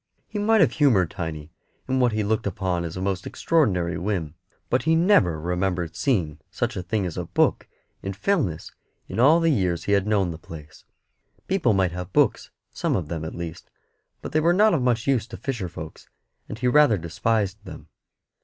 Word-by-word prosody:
He 210 - -5
might 220 0 +3
have 170 - +4
humoured 115 - +3
Tiny 80 -4 -6 0.4
in 130 0 0
what 125 -2 +3
he 110 0 -1
looked 110 +1 0
upon 90 -2 -2
as 85 +1 -6
a - - -4
most 95 -1 -2
extraordinary 95 - +1
whim, 90 -5 -2 0.3
but 125 - +1
he 160 +1 +2
never 160 - +3
remembered 90 0 -2
seeing 85 - 0
such - - -2
a - - -3
thing 95 +3 -2
as 90 -1 -5
a 90 - -3
book - - +1 0.3
in 95 - -4
Fellness 105 - -1 0.4
all 140 +9 +5
the 165 -1 +3
years 90 - 0
he - - -2
had 100 0 +2
known 100 -4 +1
the 80 - -8
place. 80 -2 -12 0.6
People 175 - +2
might 95 -3 +2
have 90 +2 -6
books, - - +2 0.2
some - - -1
of 85 -6 -3
them, 80 -2 -4
at 80 - -6
least, 85 -2 -7 0.5
but - - -6
they 155 - +2
were 170 +2 +3
not 210 +3 +4
of 160 - +1
much 120 -2 +1
use 130 -5 +1
to - - -9
fisher 120 -10 -4
folks, 80 -1 -10 0.4
and 110 - -6
he 125 +2 -1
rather 125 -4 +5
despised 100 +4 -1
them. 95 - -11
100 Hz, 195 wpm, -24 LUFS, 85-130 Hz, 0.6 s, all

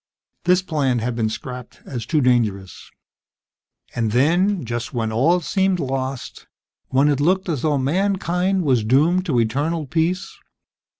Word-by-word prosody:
This 180 +1 +3
plan 145 -8 0
had 120 +1 -2
been 110 -2 0
scrapped 125 +2 -8
as 120 -4 -6
too 155 -3 +2
dangerous. 110 -7 0 1.0
And 115 -3 -1
then, 175 +7 +2
just 120 0 -4
when 110 -2 -1
all 160 +11 +2
seemed 190 +2 0
lost, 135 -2 -4 0.4
when 135 +3 +2
it 145 -2 +1
looked 185 +6 +1
as 155 -7 -2
though 150 -2 +1
mankind 185 +4 0
was 130 -7 +2
doomed 160 - +2
to 130 -7 +2
eternal 145 +8 -1
peace 170 +6 -2
140 Hz, 140 wpm, -21 LUFS, 120-175 Hz, 1.0 s, This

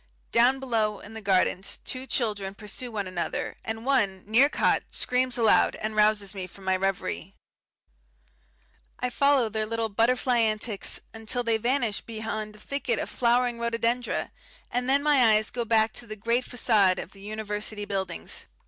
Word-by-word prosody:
Down 250 +3 +4
below 220 -5 0
in 210 - -12
the 220 - -7
gardens 190 -1 +1
two 260 0 -5
children 205 -6 -1
pursue 220 +4 -5
one 205 -3 -3
another, 185 -2 -3
and 225 +1 -4
one, 205 -9 +1
near 235 +7 +5
caught, - - +2
screams 250 0 0
aloud 225 -2 +4
and 215 0 -4
rouses 210 -2 +3
me 190 -2 -5
from 195 +2 -15
my 190 0 +2
reverie. 195 0 -2 1.6
I 250 0 -1
follow 280 -2 +3
their 215 0 -2
little 230 0 -2
butterfly 240 +3 +2
antics 215 -2 0
until 225 +2 -3
they 230 -1 +2
vanish 235 -2 0
beyond 220 -1 -5
a - - -15
thicket 255 -1 -2
of - - -3
flowering 240 0 +2
rhododendra, 235 +1 -1 0.4
and 250 +1 -1
then 280 +1 +4
my 265 -7 +5
eyes 215 0 0
go 240 -1 -2
back 220 0 +3
to 235 - -7
the 215 - -6
great 235 +4 0
facade 210 -6 +3
of 180 - -6
the 195 - -14
University 210 0 -4
buildings. 190 -4 -3
220 Hz, 165 wpm, -27 LUFS, 205-245 Hz, 1.6 s, near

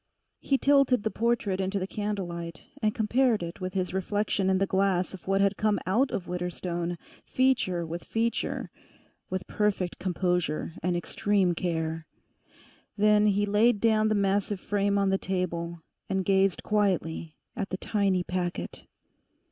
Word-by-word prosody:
He 275 - +1
tilted 275 -5 +4
the 220 - 0
portrait 220 -4 0
into 190 +1 -1
the 185 - -1
candlelight, 180 -5 -4 0.2
and 215 -1 +1
compared 230 -1 +2
it 170 +3 -7
with 185 0 -3
this 185 -2 -1
reflection 195 0 0
in 190 - +3
the 195 - +2
glass 190 -1 +1
of 185 - -11
what 195 0 +2
had 200 0 +2
come 215 -1 +2
out 235 +9 +2
of 185 -6 -4
Widderstone, 175 -1 -3 0.3
feature 235 -10 +1
with 170 +2 -6
feature, 230 +1 -1 0.6
with 185 -1 -3
perfect 200 -4 -1
composure 180 -3 -1
and 175 +1 0
extreme 190 +1 +1
care. 160 -2 -2 0.9
Then 210 0 +5
he 205 0 +2
laid 210 +2 +3
down 215 0 +3
the 215 - +2
massive 200 0 +1
frame 200 0 0
on 195 -1 +2
the 195 - +1
table, 170 -3 -3 0.3
and 190 -1 0
gazed 195 -1 +2
quietly 180 -6 0 0.2
at 195 - -3
the 185 - -3
tiny 195 -3 +1
packet. 175 - -4
195 Hz, 150 wpm, -28 LUFS, 180-210 Hz, 0.9 s, Then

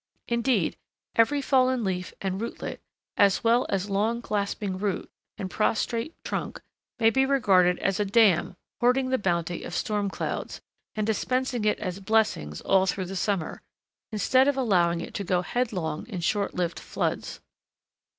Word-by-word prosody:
Indeed, 235 -6 +1 0.4
every 280 +5 +3
fallen 255 -2 +3
leaf 185 -2 -2
and 190 +1 -2
rootlet, 230 - -5 0.4
as 200 -2 +4
well 235 +2 +3
as 195 0 -1
long 220 +4 0
clasping 200 -2 -2
root, 200 -2 -2 0.3
and 190 - -3
prostrate 230 - -1
trunk, - - -4 0.4
may 225 -2 +4
be 265 +3 +3
regarded 195 -10 +4
as 195 0 0
a - - +3
dam 195 -4 +3 0.2
hoarding 255 +2 +3
the 260 - +1
bounty 175 -3 -1
of 175 - -6
storm 205 -1 -1
clouds, - - -4 0.4
and 215 -1 0
dispensing 245 +2 0
it 210 - +2
as 185 -2 -4
blessings 195 - 0
all 190 0 +3
through 190 0 -1
the 190 +2 -6
summer, 190 -3 -1 0.5
instead 255 +6 +3
of 285 -1 +2
allowing 175 -9 +2
it - - -7
to 200 - -3
go 180 -1 +1
headlong 180 -10 -2
in 200 -7 -5
short 200 +4 0
lived 175 -2 -1
floods. - - -3
205 Hz, 155 wpm, -26 LUFS, 185-235 Hz, 0.5 s, as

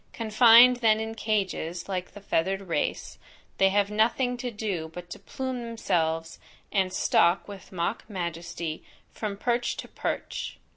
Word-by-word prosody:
Confined 230 +2 +7
then 220 -3 +3
in 220 0 -4
cages, 195 -6 -2
like 185 -2 -4
the 205 - -11
feathered 195 +1 0
race, 180 -4 -3 0.4
they 195 - +6
have 200 +1 +1
nothing 240 +4 +2
to 245 0 -3
do 205 -8 -3
but 175 0 -10
to - - -7
plume 260 -2 -4
themselves, 165 -8 -1 0.3
and 190 -2 +1
stalk 175 -1 +2
with 200 -2 -11
mock 185 +5 -3
majesty 170 -3 -4 0.3
from 205 -2 -4
perch 240 +2 0
to - - -6
perch. - - -4
200 Hz, 145 wpm, -27 LUFS, 175-225 Hz, 0.4 s, Confined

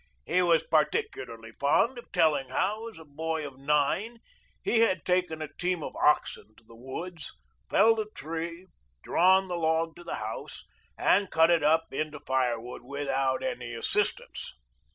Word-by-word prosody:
He 185 - +2
was 170 -2 +4
particularly 405 - -1
fond 185 - +2
of - - -15
telling 150 -7 +2
how, 210 - -1
as 225 - -14
a 160 - -12
boy 160 +1 -3
of 135 -2 -9
nine, 150 +11 +1 0.5
he 230 - +2
had 185 -9 +2
taken 180 -3 0
a 150 -1 -8
team 180 -3 -1
of - - -6
oxen 110 -7 +1
to - - -20
the 115 - -17
woods, 155 +7 -7 0.3
felled 225 +3 +5
a 215 - -1
tree, 165 +1 -6 0.4
drawn 190 +2 +4
the 175 -1 -3
log 160 0 0
to 175 - -11
the - - -4
house, 110 +1 -6 0.3
and 195 0 +3
cut 160 +1 +4
it 170 - +4
up 160 +1 +2
into 150 +1 -3
firewood 125 -3 -1
without 135 0 -1
any 245 - -4
assistance. 115 - -2
160 Hz, 160 wpm, -28 LUFS, 140-185 Hz, 0.5 s, felled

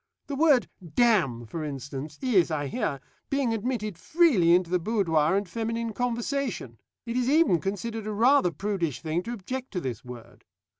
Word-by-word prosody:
The 285 - -4
word 285 -4 +4 0.3
'damn,' 180 - +3
for 155 +8 -5
instance, 140 +1 -6
is, 205 -11 +3
I 150 -2 -1
hear, 145 - -2 0.3
being 275 -4 +1
admitted 215 -5 -3
freely 220 - +4
into 180 -1 0
the 180 - +2
boudoir 170 -5 +2
and 200 0 0
feminine 230 +3 -3
conversation; 240 - -2 0.3
it 235 0 -4
is 250 0 +1
even 300 - +4
considered 215 +3 -4
a - - -2
rather 230 -1 +4
prudish 170 - -2
thing 160 +2 -1
to 235 +6 -5
object 255 +5 -5
to 180 - -1
this 125 -9 -5
word. 125 -2 -11
205 Hz, 165 wpm, -27 LUFS, 160-240 Hz, 0.3 s, word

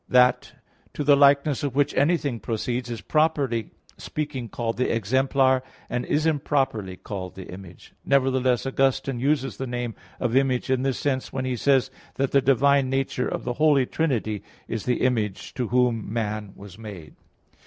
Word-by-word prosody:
That 125 0 +4 0.4
to 150 - -2
the 145 0 +6
likeness 140 0 +4
of 140 -3 -3
which 145 0 +2
anything 145 -4 +1
proceeds, 120 +3 -3
is 115 -2 -5
properly 145 -8 +1 0.3
speaking 135 -6 -4
called 115 +2 -3
the 125 - +1
exemplar, 130 +4 +2 0.3
and 125 +1 -2
is 150 +2 +1
improperly 135 -10 0
called 95 -2 -6
the 95 - -8
image. 90 -2 -12
Nevertheless 130 -2 +2
Augustine 135 0 +1
(Fulgentius) 135 +4 +1
uses 140 -3 0
the 135 - -4
name 120 -1 -3 0.3
of 120 -1 -1
Image 130 -1 +2
in 130 -1 +2
this 135 -1 0
sense 130 -2 -1
when 130 -1 -3
he 130 -1 -1
says 135 +1 +2 0.2
that 135 -1 0
the 140 - +4
divine 135 +1 +3
nature 135 -1 -1
of - - -3
the 120 - -2
Holy 145 -4 +5
Trinity 120 -9 -1 0.3
is 115 -2 -4
the 125 -1 0
Image 110 -6 -1
to 125 -5 -2
whom 120 -3 +1
man 105 -3 -3
was 100 0 -12
made. 100 -8 -9
130 Hz, 170 wpm, -25 LUFS, 115-140 Hz, 0.4 s, the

